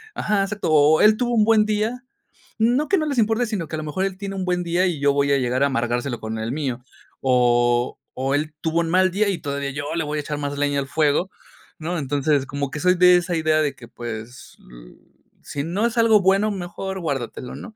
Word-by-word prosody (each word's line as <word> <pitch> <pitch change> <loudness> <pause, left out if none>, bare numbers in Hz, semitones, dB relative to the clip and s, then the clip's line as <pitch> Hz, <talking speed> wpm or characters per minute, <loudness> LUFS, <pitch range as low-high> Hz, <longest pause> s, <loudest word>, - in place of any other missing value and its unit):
ajá, 210 -2 0
exacto. 200 -1 -3
O 155 +1 +5
él 215 0 +6
tuvo 245 0 -1
un 215 -2 +4
buen 220 -1 +4
día 215 +4 -1 0.6
no 245 +7 +2
que 390 - +3
no 310 - -1
les 280 -3 -2
importe, 225 +1 +2
sino 200 -7 -3
que 160 - -5
a - - -4
lo - - -5
mejor 155 +6 -2
él 190 -1 -4
tiene 195 0 -5
un 190 -1 -3
buen 180 -1 0
día 175 +2 +1
y 170 -5 -2
yo 140 0 +3
voy 140 0 +1
a - - +4
llegar 125 +1 0
a - - +4
amargárselo 120 -1 -2
con 110 0 -4
el 110 +1 -3
mío. 130 -4 -3 0.4
O 120 -1 +2
o 135 +2 -1
él 150 +1 -2
tuvo 165 +1 0
un 165 - -2
mal 185 +1 +4
día 205 +3 +1
y 190 - -2
todavía 140 -1 -3
yo 145 +1 -5
le 165 - 0
voy 150 +1 -3
a - - -1
echar 150 0 -5
más 145 0 -3
leña 145 0 0
al 135 - -3
fuego, 155 +5 +1 0.5
¿no? 170 +3 -3
Entonces, 145 -1 0
como 140 0 -3
que 150 - -5
soy 180 +3 +3
de 180 0 +6
esa 175 0 -2
idea 155 -1 +2
de 145 -3 0
que, 125 -3 -13
pues, 120 +1 -8
l - - -14 0.5
sí 140 - -4
no 180 +8 -1
es 235 - -6
algo 225 -2 +5
bueno, 195 +3 +3
mejor 190 0 -5
guárdatelo, 135 -6 -4
¿no? 225 - -10
155 Hz, 240 wpm, -22 LUFS, 140-195 Hz, 0.6 s, él